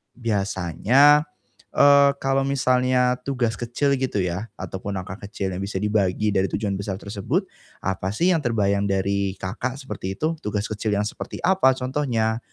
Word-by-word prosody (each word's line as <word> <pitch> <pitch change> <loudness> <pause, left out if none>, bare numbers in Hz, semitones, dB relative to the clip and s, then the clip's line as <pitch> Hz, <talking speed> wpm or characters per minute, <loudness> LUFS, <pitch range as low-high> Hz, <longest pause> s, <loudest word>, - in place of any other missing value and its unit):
Biasanya, 115 - +3 0.5
eee, 140 0 +7
kalau 135 0 +1
misalnya 125 -2 +2
tugas 125 -5 -2
kecil 135 +4 0
gitu 130 -6 -1
yah 90 +5 -3
ataupun 100 +1 -5
angka 95 +2 -6
kecil 100 -2 -3
yang 90 - -4
bisa 100 -1 -3
dibagi 105 0 +1
dari 95 -1 +1
tujuan 100 -1 -2
besar 100 0 -4
tersebut, 100 -1 -2 0.4
apa 95 0 -2
sih 175 +9 +3
yang 170 - +2
terbayang 100 -6 +1
dari 100 0 0
Kakak 115 +8 -4
seperti 95 -7 -5
itu, 160 +7 -1
tugas 105 -2 -3
kecil 105 0 -2
yang 105 - +1
seperti - - -7
apa 180 -8 +4
contohnya? 125 -4 -1
110 Hz, 155 wpm, -23 LUFS, 100-130 Hz, 0.5 s, eee